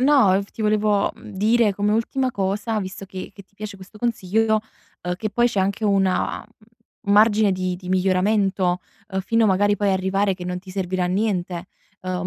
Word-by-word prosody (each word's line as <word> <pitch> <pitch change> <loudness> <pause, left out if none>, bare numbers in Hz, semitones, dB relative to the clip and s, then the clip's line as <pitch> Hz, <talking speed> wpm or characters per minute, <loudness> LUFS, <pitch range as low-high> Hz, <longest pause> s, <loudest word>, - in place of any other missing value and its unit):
No, 260 -8 +5
f 200 - -14
ti 220 - -6
volevo, 210 -1 +2
mhmm, - - -13
dire 215 0 +3
come 205 +1 0
ultima 255 +4 0
cosa, 205 +2 -1
visto 190 +1 -6
che 190 -1 -8
che 200 - -12
ti 200 - -37
piace 205 -1 -7
questo 195 +3 -14
consiglio, 220 -1 +1 0.6
che 215 - -2
poi 240 +3 +2
c'è 205 -5 0
anche 200 +3 -1
una, 195 -2 +1
mhmm, 225 -1 -8
margine 210 -1 +5
di 185 -1 -2
di 180 0 -10
miglioramento, 185 0 +2 0.3
uhm, 190 -1 -2
fino, 230 +4 +2
magari, 205 +1 +3
poi 205 0 +1
a - - +3
arrivare 190 +1 +1
che 180 -1 -8
non 180 0 -3
ti 185 0 -12
servirà 185 -1 -1
niente, 180 -2 -1 0.3
uhm, 180 -1 -3
200 Hz, 185 wpm, -22 LUFS, 185-215 Hz, 0.6 s, No